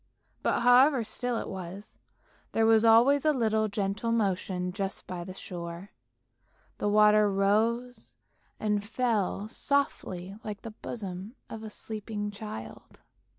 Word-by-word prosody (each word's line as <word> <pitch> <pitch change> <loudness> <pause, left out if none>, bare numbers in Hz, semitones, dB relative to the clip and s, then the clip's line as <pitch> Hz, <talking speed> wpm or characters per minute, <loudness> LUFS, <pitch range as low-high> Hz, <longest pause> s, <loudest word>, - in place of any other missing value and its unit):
But, - - +1
however 250 +2 +6
still 245 +2 -1
it - - -4
was, 190 +2 -8 0.5
there 225 - +3
was 225 0 +5
always 240 +5 +6
a 310 - +4
little 220 -5 +1
gentle 205 +2 -2
motion 185 -4 0
just 195 0 -4
by 180 -1 -5
the 185 +1 -8
shore, 175 +1 -7 0.9
the 205 - +1
water 210 0 +5
rose 215 - 0 0.4
and 210 -1 0
fell 215 -3 -1
softly 200 -9 -2
like 210 -2 -6
the 225 - -6
bosom 200 0 -7 0.2
of 225 - -6
a 220 - -7
sleeping 210 -1 -5
child. 200 - -9
210 Hz, 130 wpm, -29 LUFS, 195-230 Hz, 0.9 s, however